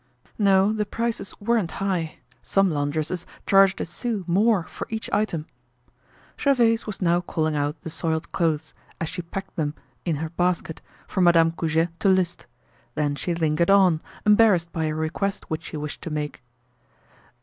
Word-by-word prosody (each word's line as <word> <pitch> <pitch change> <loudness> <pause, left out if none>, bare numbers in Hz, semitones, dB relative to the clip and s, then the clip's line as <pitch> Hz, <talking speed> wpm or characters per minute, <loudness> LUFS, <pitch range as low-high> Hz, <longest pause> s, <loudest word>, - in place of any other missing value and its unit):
No, 195 0 +4
the 210 -1 -1
prices 230 -3 -2
weren't 210 -5 0
high. 185 -5 -2 0.2
Some 195 -2 +2
laundresses 155 +4 -2 0.2
charged 195 -1 +5
a - - -1
sou 210 +4 -3
more 195 +2 +3
for - - -7
each 220 0 -4
item. 175 -8 0 0.9
Gervaise 235 -5 +3
was 205 -2 -4
now 175 0 +3
calling 155 -3 -1
out 145 +1 -1
the 160 - -5
soiled 160 0 -2
clothes, 160 -2 0 0.3
as 165 - -2
she 185 - -4
packed 190 +3 -7
them 150 -2 -1 0.3
in 170 -3 0
her 160 +2 -3
basket, 175 -1 -1 0.3
for 190 - -1
Madame 165 -2 +5
Goujet 165 0 0
to 195 - +3
list. 185 -2 +1 0.5
Then 145 -1 0
she 170 +5 -2
lingered 160 +1 +1
on, 185 -5 +5 0.2
embarrassed 210 -5 +5
by 160 -1 -1
a 155 0 -1
request 160 +6 -2
which 160 - -3
she 155 - -6
wished 150 0 -5
to - - -5
make. 150 -1 -4
170 Hz, 160 wpm, -24 LUFS, 160-195 Hz, 0.9 s, charged